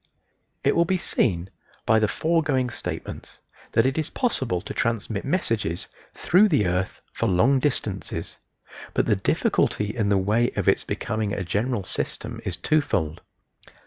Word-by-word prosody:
It - - +3
will 170 - +5
be 185 +2 +1
seen 95 - +1 0.3
by 110 - +4
the 110 - +2
foregoing 145 -3 +1
statements - - -6 0.4
that 115 - +4
it 135 +4 +1
is 155 - -2
possible 130 - 0
to 90 - -7
transmit 115 -3 -1
messages 115 - -1 0.3
through 195 +5 +4
the 125 - +3
earth 90 +2 -1
for 115 - 0
long 110 +9 +4
distances, 105 -8 -3 0.6
but - - +2
the - - +3
difficulty 105 +1 +1
in 105 -3 +1
the 100 - +4
way 110 +5 +2
of - - -1
its - - +4
becoming 110 -2 -2
a 100 - -2
general 105 +4 -1
system - - -4
is - - -3
twofold. 90 - 0
110 Hz, 150 wpm, -25 LUFS, 100-140 Hz, 0.6 s, will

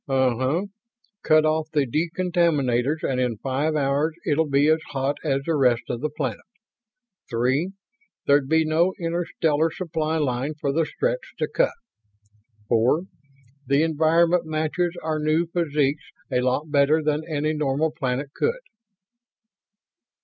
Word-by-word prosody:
"Uh 130 -2 +2
uh. 130 +7 0 0.6
Cut 155 0 +4
off 155 0 0
the 150 -3 +1
decontaminators 155 -3 0
and 130 -1 0
in 120 -3 -1
five 140 +7 -1
hours 145 +2 +1
it'll 155 0 +1
be 140 +1 +3
as 160 +1 +4
hot 135 +1 -1
as 135 -3 0
the 165 - 0
rest 125 -4 +3
of 120 - -3
the 155 - -1
planet. 135 -7 -4 0.9
Three, 130 +10 0 0.5
there'd 140 -1 +3
be 160 0 +3
no 165 +4 +2
interstellar 165 -2 0
supply 160 -2 -2
line 140 0 -1
for 140 - 0
the 160 +1 +1
Stretts - - -2
to - - -1
cut. - - +1 0.9
Four, 120 +8 +3 0.7
the 140 +3 +3
environment 165 +2 +2
matches 160 +3 -1
our 155 -1 -1
new 155 +3 +1
physiques 150 -4 0 0.3
a 125 -1 +2
lot 130 +5 -1
better 145 +2 +3
than 150 0 0
any 155 0 0
normal 150 +1 0
planet 140 -2 -3
could." 485 +2 -1
155 Hz, 140 wpm, -24 LUFS, 135-160 Hz, 0.9 s, Cut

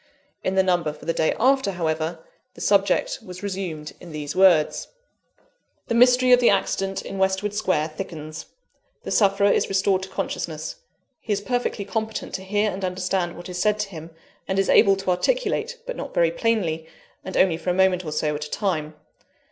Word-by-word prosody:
In 185 - -1
the 190 - +4
number 175 -5 +1
for - - -14
the 165 - 0
day 160 - +1
after, 265 -4 +3
however, 160 -1 -2 0.3
the - - -13
subject - - +2
was 180 +2 -10
resumed 180 -6 -4
in 175 - -11
these 150 -1 -5
words: 180 -5 +4 1.0
"The - - +1
mystery 250 +1 +5
of 250 - +8
the 245 - +5
accident 195 -1 0
in 195 - -6
Westwood 190 +2 +1
Square 185 -7 0
thickens. 155 -2 -7 0.6
The - - -5
sufferer 200 -1 +4
is - - +1
restored 195 -1 +2
to 190 - -7
consciousness; 160 -4 -4 0.4
he 220 - -6
is 200 - 0
perfectly 245 -2 -2
competent 220 +1 -4
to 190 - -4
hear 205 +2 +1
and 190 +1 -6
understand 180 -1 -1
what 175 - -9
is 180 -1 -4
said 210 +1 +2
to 210 - -4
him, 165 -3 -9 0.4
and 190 - -1
is 195 - +1
able 195 -1 +6
to 195 -1 -1
articulate, 485 - 0
but - - -4
not - - -7
very - - +3
plainly, 180 - -1 0.4
and 190 - -5
only 180 -4 +4
for 170 +2 -4
a - - +2
moment 185 -1 +3
or 155 - -5
so, 150 0 0
at 150 0 -4
a - - -9
time. 155 -7 -2
190 Hz, 190 wpm, -24 LUFS, 165-205 Hz, 1.0 s, of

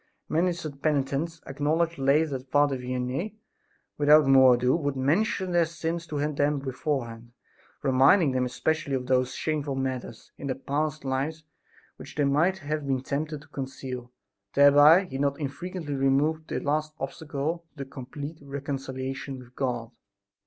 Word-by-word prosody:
Many 175 +3 +2
such 155 -5 -7
penitents 150 +2 0
acknowledged 155 +4 0
later 140 +1 +2
that 130 +1 -18
Father 145 -1 +3
Vianney, 130 +10 -3 0.6
without 150 +1 +6
more 130 -2 +7
ado, 125 +2 +2
would 145 -4 -1
mention 180 - +1
their 170 -2 +3
sins 170 +1 -4
to 150 - -4
them 145 0 +1
beforehand, 125 -4 -4 0.5
reminding 135 +4 +5
them 130 -1 +1
especially 140 +3 -1
of 125 -1 -3
those 130 0 +1
shameful 150 -3 -2
matters 130 -3 -4
in 140 - -5
their 130 - -1
past 150 +3 -2
life 140 +4 -2 0.5
which - - -11
they 150 - +1
might 155 +7 +2
have 150 -3 -3
been 130 -2 0
tempted 150 +2 -3
to - - -17
conceal. 130 -2 -6 0.4
Thereby 145 +5 +7
he 135 -6 -6
not 140 +1 0
infrequently 160 +2 -4
removed 140 +4 +1
the - - -2
last 155 +1 -1
obstacle 155 +4 -4
to 140 - -5
complete 140 +4 -8
reconciliation 135 -1 -5
with 125 0 -14
God. 120 -3 -2
140 Hz, 145 wpm, -27 LUFS, 130-155 Hz, 0.6 s, more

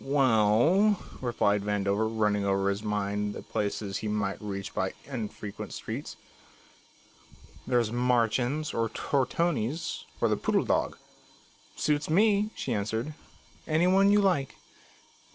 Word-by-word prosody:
"Well," 135 - +4 0.2
replied 105 -5 +1
Vandover, 105 +1 0
running 105 -2 +1
over 100 0 +1
in - - +2
his 100 - -7
mind 105 -1 -2
the - - -7
places 100 -1 -2
he 110 - -4
might 105 -2 -2
reach 100 -2 -5
by 95 0 -1
unfrequented 110 -5 -6
streets. - - -6 1.5
"There's 120 -3 +2
Marchand's 125 +4 +1
or 115 -1 0
Tortoni's 145 +3 -1
or - - +3
the - - +1
Poodle - - +1
Dog." - - 0 0.8
"Suits 150 0 0
me," 205 +4 +3
she - - -2
answered, 110 +7 -2 0.5
"any 160 +2 +2
one 195 +2 +5
you 205 0 +5
like. 175 -9 +1
115 Hz, 125 wpm, -28 LUFS, 105-150 Hz, 1.5 s, one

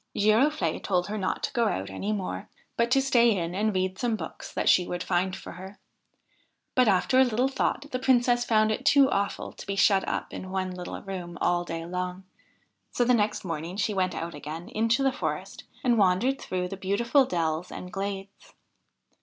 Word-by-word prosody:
Giroflde 235 +9 +2
told 180 -1 0
her 215 - -3
not 185 - -2
to - - -2
go 235 -2 +2
out 95 - -2
any 195 - -3
more, 200 -3 -4 0.3
but 235 0 +1
to 270 - +4
stay 240 -5 +4
in 170 -1 -2
and 215 +3 +1
read 185 +1 -1
some 240 -3 +1
books 165 -7 -7
that - - -2
she 180 - +5
would 175 - -3
find 185 +2 0
for - - -9
her; 190 +3 -10 1.0
but, 255 -2 +4
after 200 +6 +3
a - - +8
little 245 +1 +1
thought, 270 +1 -1
the 255 - -2
Princess 245 -2 +3
found 215 -2 +3
it 215 - -2
too 275 -1 +5
awful 200 0 -1
to - - -11
be 200 - -2
shut 195 0 +3
up - - -3
in 185 - -6
one 185 -1 -2
little 180 -1 -6
room 180 -3 -6
all 175 0 +1
day 165 -1 -5
long, 180 +1 -4 0.7
so 245 - +1
the 250 - +4
next 210 -3 +1
morning 165 +2 -4
she 210 0 0
went 185 -3 0
out 165 +1 -4
again 155 +4 -7
into 230 +4 +1
the 270 -1 +2
forest, - - -4 0.2
and 240 -3 +3
wandered 205 +8 +2
through 180 -1 -2
the 195 - -6
beautiful 235 +8 +2
dells 165 -5 -2
and 180 0 -8
glades. 195 0 -6
195 Hz, 200 wpm, -27 LUFS, 180-235 Hz, 1.0 s, a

